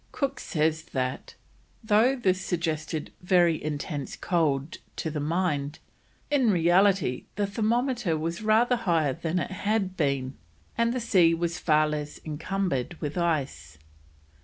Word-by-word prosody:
Cook 275 -1 -2
says 155 -2 0
that, 130 -1 -3 0.5
though 220 +5 +4
this 190 -7 +1
suggested 160 -4 -2
very 175 -3 +3
intense 145 -1 -4
cold 155 -4 0 0.2
to 160 - -3
the 150 - -3
mind, 150 -2 -1 0.5
in 265 -5 +3
reality 180 -5 +3
the 205 - 0
thermometer 225 - 0
was 165 +3 -3
rather 225 +3 +3
higher 165 - +1
than 165 +2 -3
it 175 0 -2
had 200 -1 -1
been, 140 -4 -1 0.4
and 235 0 +2
the 255 - -1
sea 185 -8 +4
was 170 0 -2
far 155 -1 +3
less 150 -1 -4
encumbered 165 -1 -2
with 150 -1 -4
ice. 140 - -2
170 Hz, 135 wpm, -27 LUFS, 150-200 Hz, 0.5 s, though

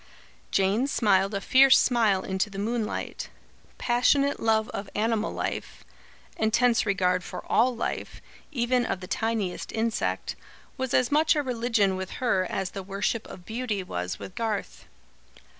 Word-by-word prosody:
Jane 200 +7 +2
smiled 200 -6 +2
a - - 0
fierce 265 +4 +6
smile 220 -6 +3
into 190 +2 -1
the 195 - -9
moonlight. 220 +2 -3 0.5
Passionate 275 +4 +2
love 220 -1 +2
of 200 0 -6
animal 220 0 0
life, - - -4 0.5
intense 230 +1 +2
regard 180 -2 +1
for 180 - -7
all 245 +2 +3
life, 230 - -4 0.3
even 245 -2 +1
of 190 - -2
the 185 - -8
tiniest 215 -2 -2
insect, 225 0 -1 0.4
was 260 -1 -1
as 255 +1 +2
much 310 +2 +4
a 295 - +1
religion 230 -6 +1
with 190 0 -5
her 195 -8 0
as 190 -1 -2
the 195 - -5
worship 200 +4 -2
of 175 - -11
beauty 220 -4 -3
was 90 - -4
with 185 - -9
Garth. 220 -2 -3
220 Hz, 145 wpm, -27 LUFS, 195-245 Hz, 0.5 s, fierce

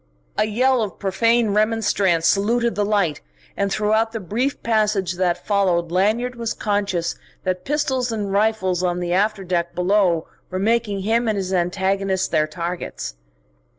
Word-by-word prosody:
A - - +2
yell 250 +4 +2
of 210 -4 -3
profane 230 +3 +2
remonstrance 205 -5 +2
saluted 235 +4 +2
the 205 - 0
light, 200 -8 0 0.3
and 200 0 -1
throughout 220 +2 +1
the 225 - -3
brief 235 +9 -2
passage 210 -5 +1
that 175 -1 -1
followed 180 -5 +1
Lanyard 215 +7 +1
was 230 -2 -3
conscious 200 -5 -1 0.3
that 185 -1 -2
pistols 265 -4 0
and 205 -3 -3
rifles 200 -4 +1
on 180 -1 0
the 175 0 -2
after 205 +1 +1
deck 175 -2 -2
below 180 -2 +2 0.2
were 185 - -3
making 210 0 0
him 225 +4 +1
and 215 -2 +1
his 190 -1 -2
antagonist 190 +1 0
their 155 -2 +2
targets. 170 - -5
200 Hz, 150 wpm, -21 LUFS, 180-220 Hz, 0.3 s, A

